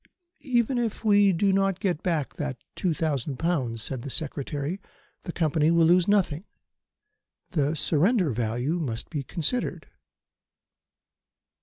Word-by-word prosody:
"Even 240 0 +2
if 225 -1 -3
we 205 -2 +5
do 190 +3 +2
not 195 -1 +1
get 185 -4 -1
back 165 -6 -1
that 145 -3 -4 0.2
two 180 - -1
thousand 145 -4 -2
pounds," 130 -10 -1
said 130 -3 -4
the 140 - -6
Secretary, 145 +4 -3 0.4
"the 175 - -3
Company 155 -2 +1
will 170 -1 +4
lose 175 +2 +4
nothing. 190 -6 +2 1.1
The 150 -3 +1
surrender 175 - +2
value 120 +8 -1
must 115 -8 -4
be 150 -4 -2
considered." 170 - -2
165 Hz, 130 wpm, -26 LUFS, 140-190 Hz, 1.1 s, we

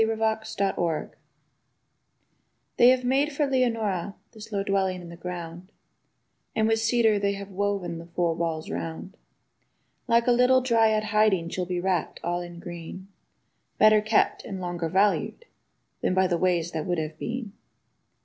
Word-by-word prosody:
8751 220 -3 0
LEONORA 165 -3 -1 1.7
They 240 0 +7
have 255 0 +3
made 270 +4 +2
for 290 +1 0
Leonora 225 -8 0 0.2
this 225 -1 -12
low 200 -1 -1
dwelling 190 -2 0
in 175 -1 -10
the 170 - -9
ground, 175 +1 -7 0.8
And 220 0 +2
with 225 0 +2
cedar 225 -2 +3
they 200 0 0
have 200 0 -8
woven 190 -3 -2
the 170 - -10
four 170 -1 0
walls 160 -1 -3
round. 165 +3 -5 0.9
Like 235 0 +3
a 245 - +4
little 250 +2 +4
dryad 225 -3 +3
hiding 210 -5 +2
she'll 180 0 -3
be 180 -1 -2
wrapped 180 -3 -1
all 175 +1 -1
in 175 -1 -9
green, 175 +2 -9 0.7
Better 215 0 +6
kept 215 +1 +1
and 190 - -6
longer 175 -2 -3
valued 200 - +1 0.6
than 185 - 0
by 190 0 +4
ways 175 -1 +1
that 160 -2 -4
would 175 -1 0
have 155 0 -4
been. 235 -4 -4
195 Hz, 150 wpm, -26 LUFS, 175-220 Hz, 1.7 s, They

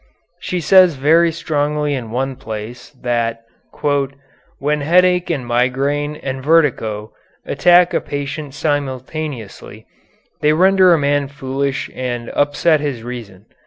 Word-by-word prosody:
She 180 -2 -3
says 185 0 +5
very 165 +5 +3
strongly 150 -2 -1
in 125 -5 -4
one 130 +3 -2
place 115 -1 -8
that 115 -2 -1 1.2
"when 150 +2 0
headache 180 +3 +3
and 140 -7 -2
migraine 135 +5 0
and 135 -3 -5
vertigo 125 -9 +1 0.3
attack 175 0 +4
a - - +1
patient 145 0 -5
simultaneously 145 -4 -4 0.5
they 150 0 +3
render 185 +2 +5
a 170 - +5
man 145 -1 +1
foolish 135 0 -3
and 120 -2 -4
upset 145 +2 +2
his 140 -6 -4
reason. 110 -5 -8
145 Hz, 120 wpm, -18 LUFS, 125-155 Hz, 1.2 s, says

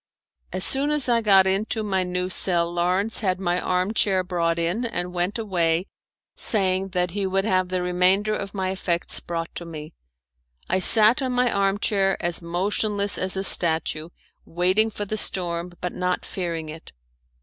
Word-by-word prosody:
As 185 - -1
soon 275 +2 +1
as 300 -3 +1
I 235 -1 +2
got 195 -3 +4
into 210 +3 -1
my 190 -3 -1
new 180 0 -2
cell 175 -2 +1
Lawrence 180 +5 0
had 185 -3 -1
my 180 -1 -1
arm 185 +3 -1
chair 195 -4 +1
brought 170 -2 -1
in, 170 +8 -1
and 180 -7 -4
went 180 +4 -2
away, 175 -5 -1 0.5
saying 190 -3 0
that 180 -1 0
he 195 +1 -2
would 195 +1 -1
have 185 -3 0
the 185 -1 -2
remainder 185 +4 +1
of 200 0 -6
my 190 -1 -2
effects 175 -2 -1
brought 165 -1 -6
to - - -7
me. 160 -1 -9 0.7
I 185 - 0
sat 220 +7 +7
on 260 -1 -2
my 250 -1 +1
arm 195 0 0
chair 195 -2 0
as 175 0 0
motionless 200 +4 0
as 185 +1 -1
a 190 - -1
statue, 160 -3 +3 0.3
waiting 185 +6 +1
for 205 -1 -6
the 215 +2 -4
storm, 175 -3 -1
but 180 - -4
not 180 0 -2
fearing 170 -4 -5
it. 155 +1 -11
185 Hz, 175 wpm, -23 LUFS, 175-205 Hz, 0.7 s, sat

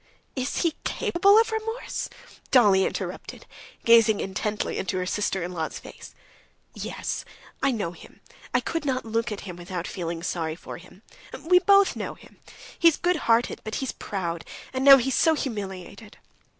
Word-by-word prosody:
"Is 260 +5 -1
he 335 -2 +2
capable 395 +4 +3
of 450 0 +4
remorse?" 445 +2 -3 0.4
Dolly 205 -7 +5
interrupted, - - -6 0.4
gazing 230 -2 +6
intently 205 +2 -2
into 190 0 -2
her 185 - -1
sister 190 -1 -1
in 175 - -4
law's 160 -3 -4
face. - - -12 0.6
"Yes. - - -4 0.4
I 275 - +3
know 210 -9 -2
him. 175 - -15 0.3
I - - +2
could 330 -2 -3
not 260 -4 -1
look 225 +1 -1
at 205 - -5
him 180 -3 -8
without 175 0 -5
feeling 170 -2 -5
sorry 160 -3 -2
for - - -9
him. 185 +3 -17 0.4
We 360 +2 +6
both 395 +1 +5
know - - -5
him. - - -19 0.4
He's 335 -2 +5
good 355 0 +1
hearted, 230 +1 +2
but 215 - -5
he's 265 - -2
proud, 170 -4 -4 0.3
and 260 0 -1
now 275 0 +10
he's 265 +1 -1
so 320 +4 +4
humiliated. 205 - -6
220 Hz, 165 wpm, -25 LUFS, 185-280 Hz, 0.6 s, now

